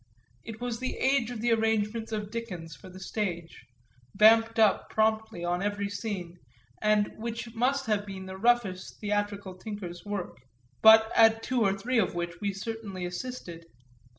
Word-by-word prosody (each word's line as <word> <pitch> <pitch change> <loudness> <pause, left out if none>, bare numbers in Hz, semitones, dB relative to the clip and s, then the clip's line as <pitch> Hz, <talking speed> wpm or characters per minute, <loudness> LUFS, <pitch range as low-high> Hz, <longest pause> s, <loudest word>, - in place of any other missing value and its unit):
It 225 -1 -8
was 240 -1 -3
the 255 0 -3
age 265 -3 +2
of 240 -3 -5
the 240 0 +1
arrangements 220 0 0
of 210 -2 -3
Dickens 180 -9 -6
for 185 - -13
the 185 +1 -11
stage, 180 -4 -4 0.5
vamped 225 +1 +5
up 215 -3 +3
promptly 220 -4 0
on 175 +1 0
every 205 0 -1
scene 185 -5 -5 0.4
and 210 -1 +2
which 230 0 -5
must 265 +4 +1
have 210 -2 +1
been 190 -1 -7
the 190 0 -7
roughest 205 -3 0
theatrical 205 -2 -2
tinkers' 185 -3 -7
work, 205 -3 -5 0.4
but 220 0 +8
at 225 0 +5
two 255 -2 0
or 195 -2 +2
three 240 +4 0
of 185 - 0
which 170 -1 -4
we 200 -1 0
certainly 195 -2 -5
assisted. 175 -3 -6
210 Hz, 160 wpm, -28 LUFS, 190-225 Hz, 0.5 s, but